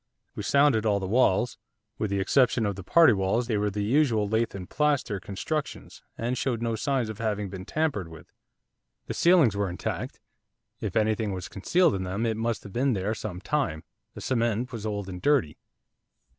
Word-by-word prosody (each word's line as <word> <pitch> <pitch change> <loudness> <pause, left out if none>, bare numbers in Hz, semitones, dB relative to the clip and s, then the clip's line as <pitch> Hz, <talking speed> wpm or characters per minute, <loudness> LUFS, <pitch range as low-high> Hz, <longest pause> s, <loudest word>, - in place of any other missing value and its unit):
We - - -5
sounded 140 -6 +3
all 105 -2 +2
the 95 - -4
walls, 115 +1 +2 0.4
with 105 - -1
the 100 0 0
exception 120 +3 +3
of 100 -1 -1
the 95 - -7
party 165 - +6
walls 95 +5 0
they 115 -2 -1
were 105 0 +1
the 105 +1 -3
usual 115 -3 +2
lath 110 +1 0
and 90 -2 -7
plaster 140 -9 0
constructions, 140 - -5 0.2
and 120 +2 -1
showed 125 -2 -1
no 115 -1 -1
signs 130 0 0
of 110 -1 -7
having 105 -3 -2
been 95 -1 -7
tampered 150 - -1
with. 80 -1 -14 0.7
The - - -4
ceilings 170 - +4
were 100 -1 0
intact; 90 - -4 0.6
if - - -4
anything 110 -1 +1
was 90 -1 -5
concealed 170 - +2
in 95 - -2
them 95 +5 -2
it 110 -1 0
must 115 0 -2
have 100 - -11
been 130 +2 +1
there 100 +1 -1
some 100 -5 -6
time, 100 - -1 0.3
the - - -8
cement 120 0 0
was 110 -3 -5
old 100 -2 -3
and 90 -1 -7
dirty. 140 - +2
110 Hz, 190 wpm, -27 LUFS, 100-125 Hz, 0.7 s, party